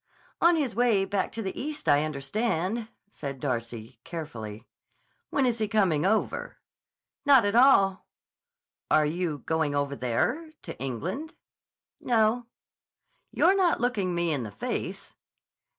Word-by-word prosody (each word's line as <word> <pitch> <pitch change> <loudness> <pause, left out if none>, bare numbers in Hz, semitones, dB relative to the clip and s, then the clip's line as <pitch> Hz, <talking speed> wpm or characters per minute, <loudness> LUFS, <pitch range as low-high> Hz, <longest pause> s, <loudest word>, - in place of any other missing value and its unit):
"On 340 0 +6
his 280 -8 -1
way 230 -5 +3
back 195 -1 -1
to 225 - -4
the 190 - -4
East, 300 +2 -5
I 145 +1 +5
understand," 185 +8 -2 0.2
said 140 -7 -6
Darcy 120 -3 -4
carefully. 120 -10 -7 0.6
"When 275 - +1
is 240 -2 0
he 215 - 0
coming 190 -7 +2
over?" 220 +2 -1 0.7
"Not 275 -6 +6
at 205 - +1
all." 215 -6 +5 0.8
"Are 155 0 +4
you 155 -3 -2
going 160 -3 0
over 140 0 -1
there—to 300 - -2
England?" 170 - -4 0.6
"No." 230 0 +2 0.8
"You're 370 +3 +3
not 365 -3 +2
looking 205 -7 0
me 170 -2 +1
in 140 - -1
the 110 - -5
face." 100 - -5
190 Hz, 130 wpm, -27 LUFS, 145-240 Hz, 0.8 s, On